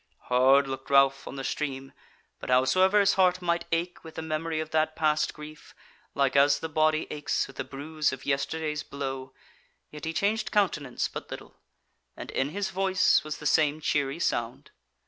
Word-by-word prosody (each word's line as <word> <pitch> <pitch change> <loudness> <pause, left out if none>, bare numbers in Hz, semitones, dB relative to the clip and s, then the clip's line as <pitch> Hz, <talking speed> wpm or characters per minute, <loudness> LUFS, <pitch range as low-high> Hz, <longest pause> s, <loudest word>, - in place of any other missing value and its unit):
Hard 135 +2 +5
looked 135 0 -6
Ralph 135 0 +4
on - - -7
the 135 - -5
stream, 135 -2 -4 0.5
but - - -8
howsoever 185 +11 +4
his 200 -1 +4
heart 185 -1 +3
might 170 -1 -1
ache 170 +2 -2
with 160 -1 -11
the 160 - -5
memory 160 0 -2
of 155 0 -5
that 155 0 +1
passed 155 -1 +1
grief, 150 0 -12 0.4
like 140 -1 +1
as 140 0 +5
the 160 - -5
body 155 0 +1
aches 150 -1 -1
with 135 - -14
the - - -2
bruise 150 +2 -2
of 135 - -8
yesterday's 150 +2 -1
blow, 135 -2 -6 0.6
yet 150 0 -8
he 160 - -2
changed 210 +5 0
countenance 150 -11 0
but - - -8
little, - - -9 0.6
and - - -7
in 135 +1 -1
his 200 +5 -3
voice 190 0 +2
was 155 0 -5
the 150 - -11
same 150 0 +2
cheery 145 -1 -1
sound. 130 -3 -2
150 Hz, 180 wpm, -27 LUFS, 135-160 Hz, 0.6 s, Hard